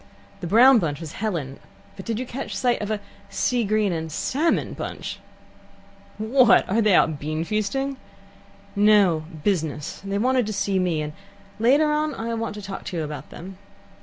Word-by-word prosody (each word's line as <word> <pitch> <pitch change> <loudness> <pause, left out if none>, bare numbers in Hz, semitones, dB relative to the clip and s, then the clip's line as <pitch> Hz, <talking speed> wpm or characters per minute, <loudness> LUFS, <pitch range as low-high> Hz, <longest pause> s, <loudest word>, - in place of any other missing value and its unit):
"The 175 - -5
brown 240 +6 +7
bunch 150 -6 -2
was 160 -3 -7
Helen, 165 -11 -4 0.4
but 190 - -9
did 225 -2 -2
you 255 - -3
catch 255 +2 -6
sight 245 -3 +1
of 210 - -3
a 215 -1 -1 0.3
sea 240 +4 0
green 210 -2 +1
and 160 -1 -4
salmon 295 - 0
bunch?" - - -6 1.0
"What! 230 +2 +4
are 220 +4 +2
they 210 -4 +4
out 155 -4 +3
beanfeasting?" 210 - -2 0.8
"No; 200 -6 +4 0.2
business. 155 -7 -2
They 200 0 -2
wanted 250 +1 +2
to 215 - -3
see 195 -1 0
me, 170 -4 0
and 150 0 -6 0.5
later 285 +7 +4
on 300 -1 0
I 230 +1 -4
want 225 -2 -3
to 210 - -8
talk 195 0 -6
to 185 -3 -4
you 160 - -1
about 150 -2 -7
them." 190 +2 -10
205 Hz, 170 wpm, -24 LUFS, 165-235 Hz, 1.0 s, brown